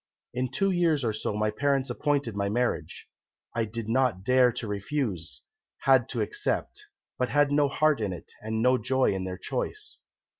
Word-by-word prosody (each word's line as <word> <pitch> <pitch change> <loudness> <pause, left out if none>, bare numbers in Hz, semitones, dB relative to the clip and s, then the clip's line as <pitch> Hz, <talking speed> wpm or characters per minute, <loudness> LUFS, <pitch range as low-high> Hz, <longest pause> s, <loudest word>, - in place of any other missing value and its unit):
"In 125 +1 -1
two 195 +9 +1
years 165 -6 +2
or 110 -2 0
so 105 -1 -2
my 105 0 +1
parents 135 +2 0
appointed 140 -7 0
my 100 0 0
marriage. 120 +3 -2 0.5
I 115 -1 +1
did 110 0 -5
not 115 -5 +1
dare 125 +2 +5
to 115 - -4
refuse, 100 - -3 0.4
had 130 -3 +4
to 120 - -2
accept, 105 - -2 0.4
but 125 - +1
had 145 +2 +3
no 145 0 +4
heart 150 -1 +2
in 105 -3 -1
it, 90 - -9
and 110 +1 -2
no 125 0 +4
joy 130 0 +2
in 95 -1 -3
their 90 0 -4
choice. - - -4
125 Hz, 180 wpm, -27 LUFS, 105-135 Hz, 0.5 s, dare